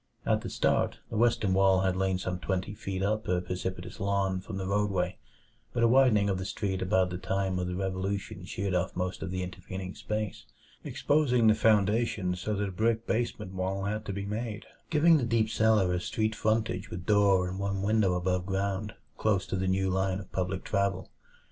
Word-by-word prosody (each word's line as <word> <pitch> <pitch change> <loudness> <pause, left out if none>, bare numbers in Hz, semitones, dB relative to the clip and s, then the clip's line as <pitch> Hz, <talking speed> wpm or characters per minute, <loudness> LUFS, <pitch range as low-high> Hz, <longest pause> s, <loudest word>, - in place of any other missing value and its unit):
At - - +2
the - - -5
start, - - +1
the - - -4
western 110 -4 +2
wall 95 -1 +4
had 95 -1 +1
lain 95 0 +1
some 90 -1 -3
twenty 95 +2 -2
feet 95 -2 -4
up 110 +2 0
a 90 0 +2
precipitous 90 0 -5
lawn 100 -1 0
from 95 +1 -6
the 95 - -3
roadway; 95 -2 0 0.5
but 120 - +1
a - - +6
widening 120 -5 +5
of 95 -2 0
the - - -3
street 95 -1 -2
at 95 - -1
about 95 -2 +2
the 90 - -4
time 95 -1 -1
of 90 - -2
the 90 - -3
Revolution 95 +1 -3
sheared 95 +1 -3
off 90 +1 0
most 90 +1 -3
of 95 - -3
the 95 0 -2
intervening 95 +1 -6
space, 105 -3 -4 0.4
exposing 135 -6 +2
the 110 - +7
foundations 105 -4 +2
so 105 +2 -1
that 100 0 -1
a - - -6
brick 110 +4 0
basement 110 -4 -2
wall 95 +1 -2
had 105 +2 -2
to 100 - -3
be 100 0 -4
made, 110 +1 -4 0.2
giving 165 +1 +5
the 140 - -1
deep 115 -1 +1
cellar 110 -5 +3
a 90 - 0
street 110 +4 -1
frontage 110 -3 0
with 85 0 -7
door 100 -3 +4
and 95 +1 -5
one 100 -1 -2
window 105 -3 +2
above 90 0 0
ground, 100 +1 -2 0.2
close 100 -3 +2
to - - -3
the 95 0 -1
new 95 0 +1
line 95 0 0
of 95 - -11
public 95 0 -2
travel. 100 -2 -1
95 Hz, 205 wpm, -29 LUFS, 95-110 Hz, 0.5 s, the